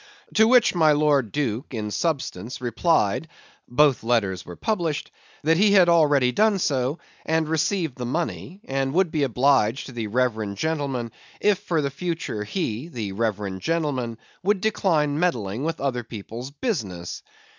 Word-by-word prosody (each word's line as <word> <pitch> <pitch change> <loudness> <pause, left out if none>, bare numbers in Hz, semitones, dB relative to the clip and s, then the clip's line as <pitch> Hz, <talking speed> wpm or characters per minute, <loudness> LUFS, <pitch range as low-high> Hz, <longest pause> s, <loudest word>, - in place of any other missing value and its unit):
To 220 0 +5
which 250 -1 +5
my 160 -4 +4
Lord 145 -6 +2
Duke 130 -2 -2
in 105 -1 -3
substance 135 - -2
replied 125 - +1 0.4
(both 140 +1 +3
letters 100 -6 +1
were 90 - -9
published) 170 - -2 0.3
that 160 +2 +3
he 200 +2 +4
had 185 -3 +6
already 145 -6 +4
done 210 - +3
so, 140 -4 0 0.3
and 160 0 +1
received 160 -2 0
the 125 - -3
money, 175 +6 -3
and 135 +1 -1
would 185 -3 +3
be 155 - 0
obliged 135 -2 +2
to - - -9
the 115 -3 -4
reverend 110 -3 -1
gentleman 140 -5 -2 0.3
if 205 -2 +2
for 170 -7 -1
the 140 - -1
future 165 -8 -3
he 120 - -3
(the 115 - -5
reverend 100 -2 -2
gentleman) 145 -8 -1 0.2
would 200 +1 +1
decline 165 -8 +1
meddling 120 - -1
with 165 0 -2
other 125 -3 -1
people's 115 +3 -7
business. 110 - -4
140 Hz, 155 wpm, -24 LUFS, 115-165 Hz, 0.4 s, had